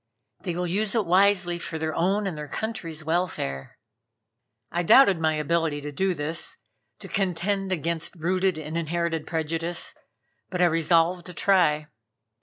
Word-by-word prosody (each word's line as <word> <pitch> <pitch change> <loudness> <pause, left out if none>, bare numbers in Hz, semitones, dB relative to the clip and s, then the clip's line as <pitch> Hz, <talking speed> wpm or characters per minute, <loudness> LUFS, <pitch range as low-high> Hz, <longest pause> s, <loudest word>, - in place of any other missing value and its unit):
They 175 -4 -3
will 180 +1 -1
use 200 +5 +1
it 220 -3 +2
wisely, 180 -1 +3
for 160 - -5
their 160 0 -2
own 195 +5 +1
and 190 -4 -2
their 150 -1 -6
country's 165 -5 -4
welfare." 160 - -2 0.9
I 175 - 0
doubted 195 0 +6
my 160 -1 +1
ability 155 0 0
to 150 0 -6
do 190 +5 0
this, 155 +2 -4 0.4
to - - -8
contend 195 +1 -1
against 170 0 -2
rooted 185 +1 0
and 155 +2 -3
inherited 165 -1 -2
prejudice, 165 +1 -2 0.6
but 180 - -4
I 180 - +5
resolved 170 +1 +2
to 180 - -9
try. 155 -6 +2
170 Hz, 150 wpm, -26 LUFS, 160-185 Hz, 0.9 s, doubted